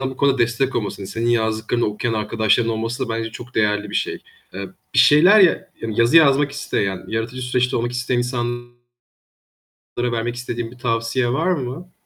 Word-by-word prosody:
bu 130 -1 -4
konuda 140 -1 +2
destek 120 +3 0
olmasını, 100 -3 -4
senin 115 +4 -1
yazdıklarını 110 +1 0
okuyan 110 +2 -2
arkadaşların 110 +1 +1
olması 115 +4 -3
da 120 - -9
bence 115 0 -3
çok 125 +2 -11
değerli 105 -1 0
bir - - -8
şey. - - -1 0.4
Eee, 100 0 -5 0.3
bir - - +3
şeyler 180 +9 +7
ya 185 -3 +3
yazı 115 +5 +2
yazmak 145 -2 +5
isteyen, 100 -9 -2
yaratıcı 115 +3 -3
süreçte 125 0 0
olmak 120 +1 -1
isteyen 125 0 -1
insanlara 120 -1 -3 1.4
vermek 120 +1 -2
istediğin 120 -2 -5
bir 125 - -15
tavsiye 120 0 0
var 165 +7 +1
mı? 165 +2 -4
120 Hz, 165 wpm, -21 LUFS, 115-130 Hz, 1.4 s, şeyler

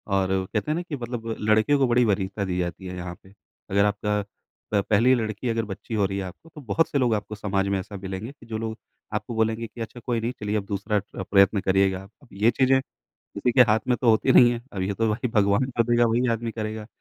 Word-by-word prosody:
और 95 -1 +1 0.2
कहते 110 +8 -1
हैं - - +1
ना 175 - -1
कि 170 -5 -5
मतलब 120 -2 -5
लड़के 110 +6 +3
को 135 -2 +3
बड़ी 120 +1 +4
वरीयता 100 0 -1
दी 90 -1 -2
जाती 90 +2 -4
है 90 - -6
यहाँ 90 0 -6
पे। 95 +1 -18 0.4
अगर 100 +1 +3
आपका 105 0 0 0.5
प 100 - +4
पहली 115 +5 +5
लड़की 110 +1 -2
अगर 115 -1 0
बच्ची 100 +3 -7
हो 105 -2 +2
रही 95 +1 -2
है 100 - -2
आपको, 95 - -11
तो 150 - -12
बहुत 135 +7 +1
से 140 - 0
लोग 120 -3 +2
आपको 105 +1 -5
समाज 100 -1 -1
में 100 -1 0
ऐसा 100 +2 -8
मिलेंगे, 95 +5 -6
कि 145 - -18
जो 110 -1 -4
लोग 110 0 -4 0.4
आपको 115 - -3
बोलेंगे 110 +1 0
कि 115 - -10
अच्छा 115 +2 -6
कोई 120 -2 0
नहीं, 115 +2 -1
चलिए 105 0 -1
अब 100 - -3
दूसरा 100 +1 -1
ट्र 95 -1 -8
प्रयत्न 100 +1 +5
करिएगा। 95 0 +1 0.3
ये 110 +4 +3
चीज़ें 130 +2 +3 0.4
किसी 125 - -3
के 125 - +7
हाथ 110 - +4
में 125 - +3
तो 120 -3 +4
होती 110 +4 +3
नहीं 120 -1 +8
है, 120 - -4
अब 95 -2 -3
ये 100 +1 -1
तो 115 +2 +1
भाई 115 +4 -1
भगवान 100 +2 +3
का 115 - +5
दिया, 120 0 +4
वही 120 +3 +1
आदमी 115 0 -2
करेगा 110 -1 -5
110 Hz, 245 wpm, -25 LUFS, 100-120 Hz, 0.5 s, नहीं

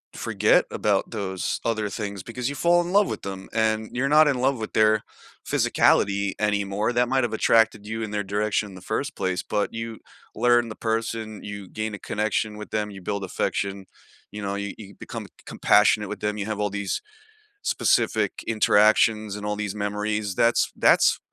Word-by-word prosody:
forget - - +2
about 100 +1 0
those 95 -4 -3
other 110 -2 0
things 100 -2 -5
because 125 +4 -4
you 140 - -5
fall 175 +3 +3
in 175 - -4
love 205 +1 +4
with - - -4
them, 95 -1 -7
and 110 -1 0
you're 130 +3 0
not 155 +1 +6
in 135 -4 +1
love 135 +1 +2
with 110 -1 -6
their 110 -1 +3 0.4
physicality 100 0 +2
anymore. 105 +1 0
That 125 +1 +2
might 130 +1 +1
have 120 -2 -1
attracted 110 -1 +3
you 110 +1 -4
in 110 - -3
their 105 0 -2
direction 105 +1 -1
in 95 - -12
the 95 - -11
first 140 +9 -3
place, 90 -1 -2
but 105 - -1
you 115 -1 -6 0.3
learn 120 0 +3
the 110 - -7
person, 110 -1 -3
you 100 -2 -7
gain 110 0 -4
a 100 - -6
connection 105 0 -2
with 105 - -9
them, 105 -1 -1
you 95 -2 -10
build 100 +1 -3
affection, 95 +1 -2 0.5
you 105 - -7
know, 100 0 -2
you 100 -1 -4
you 100 -2 -11
become - - -7
c - - -27
compassionate 105 0 +3
with 105 - -6
them, 105 0 -2
you 100 - -3
have 110 -1 -3
all 105 -1 0
these 100 - -3 0.6
specific - - +1
interactions 110 0 +3
and 105 0 -7
all 105 0 -2
these 105 -1 -3
memories. 105 -1 -2
That's 115 0 +3
that's - - +4
105 Hz, 190 wpm, -24 LUFS, 100-115 Hz, 0.6 s, not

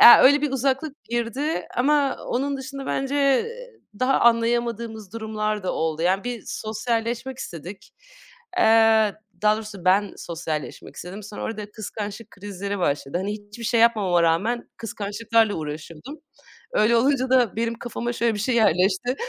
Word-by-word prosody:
Eee, 240 - +12
öyle 285 +3 +6
bir 295 - +1
uzaklık 270 +3 -1
girdi 240 +6 -2
ama 280 +2 +2
onun 275 +3 -1
dışında 270 0 -7
bence, 270 +1 -1
eee, 450 - 0 0.2
daha 260 +1 +3
anlayamadığımız 230 -3 +1
durumlar 215 -2 -2
da 185 - -1
oldu. 160 0 -1
Yani 190 +5 +2
bir 245 -2 -4
sosyalleşmek 230 +3 -3
istedik. 175 - -8 0.7
Eee, 220 - +5 0.3
daha 210 0 +4
doğrusu 210 -4 -8
ben 195 +2 +3
sosyalleşmek 160 -3 -5
istedim. 190 +4 -7
Sonra 205 +1 -8
orada 210 -2 -5
kıskançlık 215 +1 -6
krizleri 200 0 -5
başladı. 145 -1 -1
Hani 200 +2 -2
hiçbir 210 +2 -9
şey 230 0 +2
yapmama 200 -7 +4
rağmen 200 +9 +1
kıskançlıklarla 220 0 0
uğraşıyordum. 155 - -7 0.5
Öyle 230 - +4
olunca 260 +1 +2
da 245 -5 +3
benim 230 0 0
kafama 240 0 -4
şöyle 230 -2 +1
bir - - -4
şey 245 +3 0
yerleşti. 215 +3 +3
225 Hz, 145 wpm, -24 LUFS, 200-245 Hz, 0.7 s, Eee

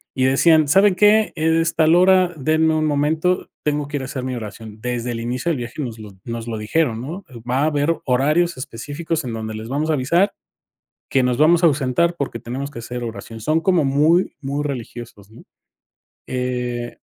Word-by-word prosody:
y 130 0 +1
decían: 155 +3 +4
"¿Saben 195 +4 +5
qué? 210 +2 +4
Es 160 +1 +1
tal 160 +1 +4
hora, 185 0 +4
denme 155 +3 +2
un 155 0 +1
momento, 155 +5 0
tengo 150 -1 -1
que 145 0 -3
ir 135 - -5
a - - -4
hacer 130 -1 -5
mi 130 -1 -3
oración". 110 -1 -8
Desde 125 0 -3
el 115 - -4
inicio 125 +7 -2
del 155 - 0
viaje 120 +5 -6
nos 115 -4 -5
lo 105 -2 -10
nos 115 0 -5
lo 110 -1 -3
dijeron, 115 +1 0
¿no? 170 +9 -7 0.2
Va 130 +2 +1
a - - +3
haber 150 +1 +1
horarios 150 +6 +2
específicos 145 +5 -4
en 120 - -4
donde 110 -1 -5
les 110 +1 -7
vamos 150 +4 -1
a - - +3
avisar 170 +9 +2 0.8
que 135 -2 +2
nos 125 -1 +1
vamos 165 +3 +4
a - - +8
ausentar 150 +4 +1
porque 135 -4 -3
tenemos 130 +5 -5
que 115 - -8
hacer 125 +1 -6
oración. 115 0 -7
Son 155 +4 +1
como 175 -6 +2
muy 155 +6 +2
muy 140 +2 -2
religiosos, 120 -6 -7
¿no? 115 - -15 0.8
Eh 125 -1 -3
140 Hz, 195 wpm, -20 LUFS, 120-160 Hz, 0.8 s, a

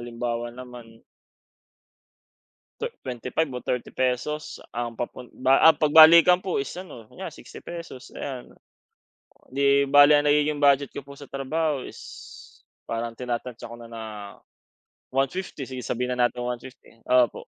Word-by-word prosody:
halimbawa 120 0 -4
naman 120 -2 -12 1.8
twe - - -3
25 125 +5 -3
o 125 - -5
30 125 -1 -2
pesos 130 +4 -2
ang 120 0 -4
papun 120 0 -6
ba 130 +1 +5
ah, 160 - +10
'pag 150 -1 0
balikan 170 +3 +8
po 185 -7 -1
is 135 - -4
ano, 150 - -10
kunyare - - -8
60 - - -13
pesos, 170 -7 -9
ayan. 130 -3 -7 1.0
'Di 140 +1 +2
bale 145 +1 +7
ang 145 - 0
nagiging 150 0 +2
budget 140 -1 +3
ko - - -7
po 140 - -11
sa 140 - -12
trabaho 140 +1 -2
is - - -11 0.9
parang 115 0 -4
tinatantiya 120 -1 -5
ko - - -7
na 115 - -11
na 115 -1 -8 1.1
150. 135 +3 -2
Sige, 130 0 -7
sabihin 125 +1 -2
na 120 0 +3
natin 120 0 -7
150, 125 -1 -8
opo. 125 -1 +2
130 Hz, 145 wpm, -25 LUFS, 120-145 Hz, 1.8 s, ah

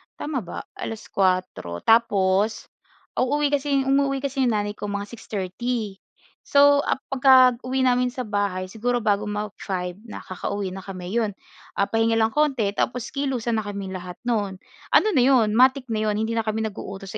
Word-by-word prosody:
Tama 290 -3 -3
ba, 175 -5 -7
alas-kuwatro? 185 - -2
Tapos 210 -2 +2 0.5
uuwi 290 +3 +1
kasi, 280 -1 +1
umuuwi 275 0 +1
kasi 275 0 -3
'yong 240 -4 +2
nanay 205 0 -1
ko 205 0 -6
mga 200 0 -3
6:30. 215 0 -4 0.4
So, 285 0 +5
ah, - - +1 0.2
pagka 255 -2 +6
uwi 260 +1 0
namin 250 0 +3
sa 255 0 -4
bahay 200 -3 -1
siguro 245 +2 -1
bago 205 -1 +2
mag-five, 200 -3 -4
nakakauwi 195 -1 -5
na 190 - -7
kami 185 -1 -7
'yon. 220 -4 0 0.4
Ah, 200 - +2
pahinga 225 +2 +1
lang 220 0 +2
konti 270 -9 +1
tapos 245 +3 -2
kilusan 255 -5 -1
na 205 - -5
kaming 200 -2 -5
lahat 180 -1 -7
no'n. 210 -5 -1 0.4
Ano - - +6
na 265 -8 +3
'yon, 235 -6 +4
matic 260 -1 +4
na 215 0 0
'yon. 210 - +1
Hindi 225 +1 -1
na - - 0
kami 220 +1 -1
nag-uutos 195 -2 -6
220 Hz, 165 wpm, -24 LUFS, 200-255 Hz, 0.5 s, pagka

